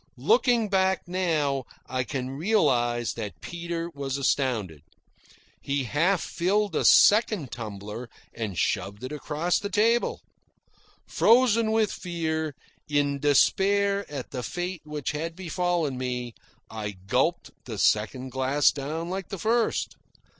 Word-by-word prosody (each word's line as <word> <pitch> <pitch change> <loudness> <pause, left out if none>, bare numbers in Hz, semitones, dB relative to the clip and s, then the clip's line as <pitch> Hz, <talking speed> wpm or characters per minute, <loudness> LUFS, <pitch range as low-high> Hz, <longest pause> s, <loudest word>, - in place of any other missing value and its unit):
Looking 245 - +3
back 190 -2 +1
now, 155 -7 0 0.2
I 130 -1 -2
can 130 +1 -4
realise 130 - +1
that 105 -8 -6
Peter 170 - -4
was 140 -2 -3
astounded. 120 - 0 0.8
He 140 0 -1
half 165 - +1
filled 200 +1 0
a - - +1
second 205 - +5
tumbler 105 +1 -7 0.2
and 110 -6 -4
shoved 100 - -1
it 130 - -5
across 150 +3 -1
the 200 - -4
table. 230 +3 +2 0.8
Frozen 230 -2 +4
with 220 -1 +2
fear, 160 -4 -3 0.3
in 145 -1 +1
despair 200 +7 +2
at 140 -4 -6
the 125 - -4
fate 175 +5 -4
which 150 -3 -3
had 160 +2 -4
befallen 175 -6 -1
me, 125 -2 -3 0.3
I 105 -2 -5
gulped - - 0
the - - -6
second 125 +5 +1
glass 130 +3 +3
down 155 +5 -4
like 190 0 -4
the 195 - -5
first. 225 +5 0
150 Hz, 125 wpm, -26 LUFS, 130-190 Hz, 0.8 s, second